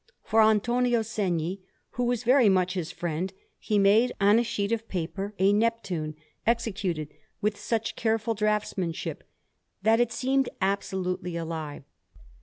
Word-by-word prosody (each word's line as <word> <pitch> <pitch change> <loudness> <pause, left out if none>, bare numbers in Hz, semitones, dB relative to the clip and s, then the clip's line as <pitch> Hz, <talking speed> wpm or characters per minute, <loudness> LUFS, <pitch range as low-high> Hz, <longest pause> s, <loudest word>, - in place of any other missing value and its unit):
For 225 +1 +3
Antonio 235 +2 +3
Segni, 190 -5 -2 0.3
who 245 - -1
was 245 -1 0
very 250 -2 +5
much 185 -1 +2
his 180 -4 -3
friend, 175 +2 -3 0.3
he 210 - 0
made, 210 +5 +5
on 205 +3 +5
a - - +2
sheet 205 -2 -2
of 230 0 -1
paper, 195 +3 -4
a 195 +2 +4
Neptune 205 -8 0 0.3
executed 195 -9 0 0.3
with 210 0 0
such 225 +2 -2
careful 225 0 0
draughtsmanship 210 -5 -2 0.6
that 225 +1 +4
it 240 -1 +2
seemed 265 +3 +1
absolutely 190 -2 -1
alive. 160 -4 -5
205 Hz, 135 wpm, -27 LUFS, 185-230 Hz, 0.6 s, very